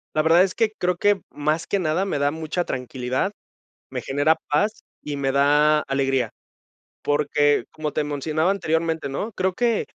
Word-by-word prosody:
La 155 - +3
verdad 165 +3 +6
es 190 - -3
que 225 -2 +2
creo 180 0 +1
que 205 +1 +2
más 155 +2 -1
que 200 - 0
nada 170 +3 +1
me 165 -7 -2
da 145 - +3
mucha 160 +3 -3
tranquilidad, 130 - -2 0.6
me - - -3
genera 145 +4 +2
paz 205 +9 0 0.2
y 145 -1 -4
me 135 -1 0
da 150 +2 +4
alegría. 135 -4 0 0.7
Porque, 145 0 +2
como 155 -1 -4
te 150 - 0
mencionaba 155 +4 0
anteriormente, 160 -5 -1
¿no? 210 +11 -3
Creo 185 -1 -1
que 235 +1 +1
155 Hz, 170 wpm, -23 LUFS, 145-180 Hz, 0.7 s, verdad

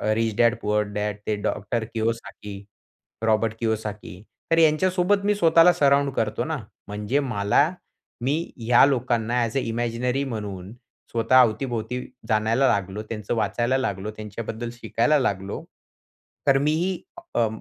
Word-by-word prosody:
Rich 115 -1 0
Dad 115 -2 +5
Poor 105 0 +2
Dad 105 0 -1
ते 105 - +1
doctor 110 +3 -1
Kiyosaki, 115 -2 -3 0.7
Robert 110 0 +2
Kiyosaki. 105 -5 -3 0.3
तर 165 - +4
यांच्यासोबत 180 +5 +3
मी 210 0 +3
स्वतःला 165 -1 +6
सराउंड 140 -3 +3
करतो 110 -4 -1
ना. 160 -1 -2 0.3
म्हणजे 105 +6 -1
मला, 125 +2 +2 0.5
मी 135 +5 +1 0.2
ह्या 120 +3 +5
लोकांना 120 -3 +1
ॲज 115 +3 -2
अ 135 - +2
इमॅजिनरी 120 +3 -1
म्हणून 105 -6 -5 0.4
स्वतः 115 +3 +4
अवती-भोवती 120 0 -1 0.3
जाणायला 110 +5 +2
लागलो, 100 -1 -1
त्यांचं 105 -1 -4
वाचायला 120 +4 +1
लागलो, 105 -5 -2
त्यांच्याबद्दल 110 +2 -5
शिकायला 120 +5 +1
लागलो. 100 -6 -2 0.8
तर 135 -1 +6
मी 145 +2 +2
ही 180 +3 -1 0.3
अ, 115 - +3
115 Hz, 135 wpm, -24 LUFS, 105-135 Hz, 0.8 s, स्वतःला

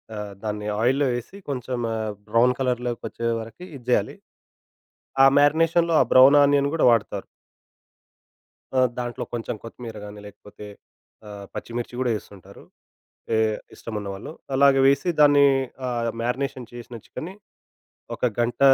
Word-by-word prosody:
ఆహ్, 105 -1 -6
దాన్ని 105 -1 -4
ఆయిల్‌లో 135 +4 +2
ఏసి, 120 +11 -9
కొంచెం 125 -2 -3
ఆ - - -2 0.3
బ్రౌన్ 115 +4 +3
కలర్‌లొకొచ్చే 125 -2 -2
వరకి 115 +11 -9
ఇది 125 -3 -12
జేయాలి. 125 - +1 1.1
ఆ - - +9
మ్యారినేషన్‌లో 165 +3 +3
ఆ - - +6
బ్రౌన్ 135 +3 +8
ఆనియన్ 140 0 +3
గూడ 165 - 0
వాడతారు. 115 -3 0 1.5
ఆ! - - +6 0.2
దాంట్లో 120 -1 -4
కొంచెం 115 -1 -4
కొత్తిమీర 115 -1 -9
గానీ, 105 0 -10
లేకపోతే 105 +1 -13 0.6
ఆహ్, 100 -1 -9
పచ్చిమిర్చి 120 +1 -5
గూడా 130 -1 0
ఏస్తుంటారు. 100 -1 -15 0.7
ఏహ్, 110 -1 +1 0.2
ఇష్టమున్నవాళ్ళు. 105 0 -6 0.2
అలాగ 140 0 +6
వేసి 140 +5 +3
దాన్ని 145 -1 +6 0.4
ఆహ్, 120 -1 -1
మ్యారినేషన్ 130 +1 -3
చేసిన 120 0 -9
చికెన్‌ని 180 +4 -7 0.8
ఒక - - -16 0.2
గంట, 120 0 -1
120 Hz, 125 wpm, -24 LUFS, 110-140 Hz, 1.5 s, ఆ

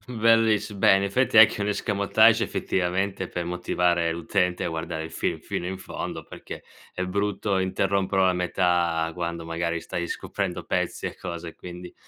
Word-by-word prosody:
Belliss 110 -1 +3
bene, 100 0 +3
fai 130 +6 +2
te 110 0 +9
che - - -7
un 100 - -1
escamotage 105 +2 +3
effettivamente 95 +1 -1
per 90 - -4
motivare 85 -1 0
l'utente 90 +2 0
a - - -1
guardare 80 -1 -4
il 80 - -8
film - - -2
fino 85 - -4
in 95 +1 -4
fondo, - - -6
perché - - -10 0.3
è 90 - -3
brutto 100 +1 -1
interromperlo 95 +1 +1
a 95 - +4
metà 90 -2 +1
quando 85 -1 -4
magari 85 0 -2
stai 85 +1 -4
scoprendo - - -4
pezzi - - -2
e - - -9
cose, 85 -1 -6
quindi 90 0 -9
90 Hz, 160 wpm, -25 LUFS, 85-100 Hz, 0.3 s, te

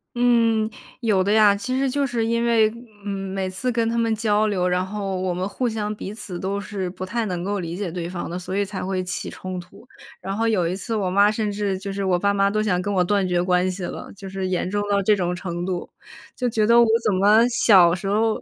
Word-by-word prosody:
嗯， 230 -3 +3 0.3
有 210 -6 +2
的 200 - 0
呀。 210 -2 +6
其 230 +6 -3
实 270 -1 +1
就 280 +2 0
是 240 -4 -1
因 235 +1 0
为， 225 -2 +4 0.4
嗯， 205 - -2 0.2
每 190 -1 -2
次 240 +7 -2
跟 230 -1 0
他 230 - -1
们 230 -1 +1
交 215 -1 +1
流， 185 -3 0
然 180 +1 +1
后， 195 -1 -4
我 185 -1 -1
们 180 +2 -2
互 245 +4 -2
相 215 -1 -3
彼 200 0 -6
此 210 -5 -7
都 195 +2 -2
是 195 -3 -4
不 185 +1 -6
太 230 +4 -2
能 180 -1 -3
够 205 -1 -1
理 170 0 -5
解 200 -2 -3
对 170 0 -5
方 175 -2 -5
的， 175 - -4
所 185 +2 -4
以 205 - +1
才 195 0 -5
会 190 -1 -1
起 180 - -4
冲 185 0 -6
突。 180 +7 -12 0.3
然 195 +1 -4
后 225 +1 0
有 180 -6 +1
一 180 - -2
次 225 +4 -5
我 190 -3 0
妈 200 +3 +4
甚 215 -1 -1
至 200 -1 -2
就 195 0 -5
是 200 - -3
我 185 -2 +1
爸 200 +2 +2
妈 200 0 +3
都 215 +1 0
想 185 -4 +1
跟 205 +1 -2
我 185 - +2
断 200 +2 +1
绝 180 -1 +1
关 180 +1 +2
系 185 0 -6
了， - - -7
就 195 0 -10
是 190 -1 -3
严 180 0 -1
重 205 +1 -1
到 200 -1 +2
这 210 +2 +3
种 180 -2 -1
程 175 -1 -4
度。 180 -2 -3 0.5
就 250 -1 -1
觉 215 -1 +1
得 235 +1 +6
我 - - +6 0.2
怎 210 - +3
么 210 +5 +5
小 190 -8 +5
时 190 +2 -6
候 215 +2 +1
200 Hz, 275 characters per minute, -23 LUFS, 185-220 Hz, 0.5 s, 呀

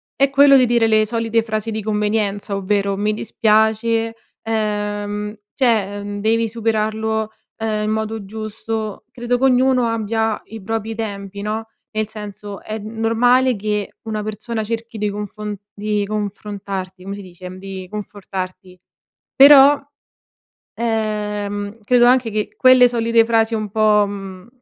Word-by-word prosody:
è 275 0 +3
quello 275 0 +7
di 255 - +5
dire 235 -1 +3
le 215 -1 +4
solite 230 0 0
frasi 220 0 -3
di 220 0 -3
convenienza, 210 -1 -1
ovvero: 200 0 0
"Mi 210 +1 0
dispiace." 220 +1 +1 0.3
Ehm, 210 -1 -2 0.2
cioè, 215 -6 +1
uhm, 205 0 -5
"Devi 225 +2 +2
superarlo, 220 -1 -1 0.3
uhm, 215 -1 -1
in 210 - -1
modo 220 0 -2
giusto." 215 0 -5
Credo 245 0 -1
che - - -2
ognuno 255 -1 +3
abbia 225 -1 -1
i 225 - -9
propri 225 +2 -3
tempi, 200 -3 -5
no, 215 +2 -3 0.3
nel 215 -1 -1
senso, 205 -1 -8
è 215 - -5
normale 230 +4 +2
che 210 0 -2
una 215 -1 -3
persona 215 +2 -4
cerchi 230 +1 -5
de 210 0 0
confon 210 0 -5 0.2
di 210 0 -1
confrontarti 200 -2 -5
come 195 +1 -5
si 205 - -8
dice, 180 0 -10
di 190 -1 -7
confortarti. 190 -3 -7 0.6
Però, 280 0 +9 1.0
ehm, 210 -2 -2
credo 240 +2 +4
anche 250 -1 +4
che 210 0 -2
quelle 255 -1 +7
solite 230 -1 +2
frasi 225 0 +2
un 215 -1 -3
po' 215 -1 +4
mhmm, 195 -1 -8
215 Hz, 140 wpm, -20 LUFS, 205-225 Hz, 1.0 s, Però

